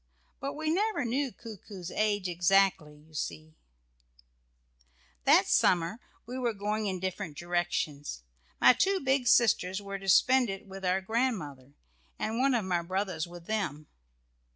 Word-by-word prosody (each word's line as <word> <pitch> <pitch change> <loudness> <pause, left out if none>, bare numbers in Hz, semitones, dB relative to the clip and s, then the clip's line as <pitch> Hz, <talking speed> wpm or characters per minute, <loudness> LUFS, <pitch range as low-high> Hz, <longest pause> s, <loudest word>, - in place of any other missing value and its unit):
But 275 0 -4
we 310 +1 -2
never 415 - 0
knew 260 +3 -1
Coo 225 -3 -10
coo's 185 -3 -9
age 205 -3 0
exactly, 175 -3 +2
you 155 +2 -21
see. 155 +1 -5 1.7
That - - +6
summer 175 +5 +2 0.3
we 250 +3 -6
were 240 -3 -1
going 210 +1 -2
in 190 -2 -2
different 185 -4 -4
directions. 165 - -2 0.4
My - - +7
two 385 +10 +1
big 265 -1 +1
sisters 195 -5 +3
were 200 -1 -6
to 195 0 -4
spend 250 +6 +5
it 195 +2 -6
with 195 0 -10
our 185 +1 +1
grandmother, 190 - -2 0.4
and 220 +2 -2
one 265 0 +3
of 220 -5 0
my 175 -2 0
brothers 185 -2 -2
with 175 -1 -11
them. 180 -9 -2
195 Hz, 150 wpm, -29 LUFS, 175-235 Hz, 1.7 s, My